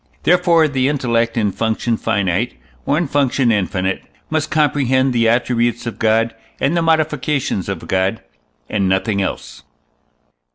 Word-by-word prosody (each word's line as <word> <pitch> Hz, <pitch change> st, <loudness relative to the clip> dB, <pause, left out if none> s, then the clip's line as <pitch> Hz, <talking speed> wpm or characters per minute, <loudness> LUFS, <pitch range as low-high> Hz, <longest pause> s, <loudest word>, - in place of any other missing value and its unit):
Therefore 170 Hz, -2 st, +4 dB
the 135 Hz, -3 st, 0 dB
intellect, 120 Hz, -5 st, 0 dB
in 105 Hz, -3 st, +1 dB
function 115 Hz, +2 st, -1 dB
finite, 100 Hz, 0 st, -1 dB, 0.3 s
or 145 Hz, -, +2 dB
in 170 Hz, -, +1 dB
function 135 Hz, -3 st, +1 dB
infinite, 95 Hz, -2 st, -1 dB, 0.3 s
must 155 Hz, -1 st, 0 dB
comprehend 135 Hz, -4 st, +2 dB
the 115 Hz, -1 st, +3 dB
attributes 120 Hz, 0 st, 0 dB
of 115 Hz, -, -5 dB
God 115 Hz, +1 st, +2 dB, 0.3 s
and 140 Hz, +5 st, +1 dB
the 170 Hz, -, +2 dB
modifications 150 Hz, -, 0 dB
of 95 Hz, -4 st, -5 dB
God, 95 Hz, +3 st, 0 dB, 0.5 s
and 100 Hz, -3 st, 0 dB
nothing 100 Hz, +2 st, 0 dB
else. 95 Hz, -, -5 dB
120 Hz, 135 wpm, -18 LUFS, 110-145 Hz, 0.5 s, Therefore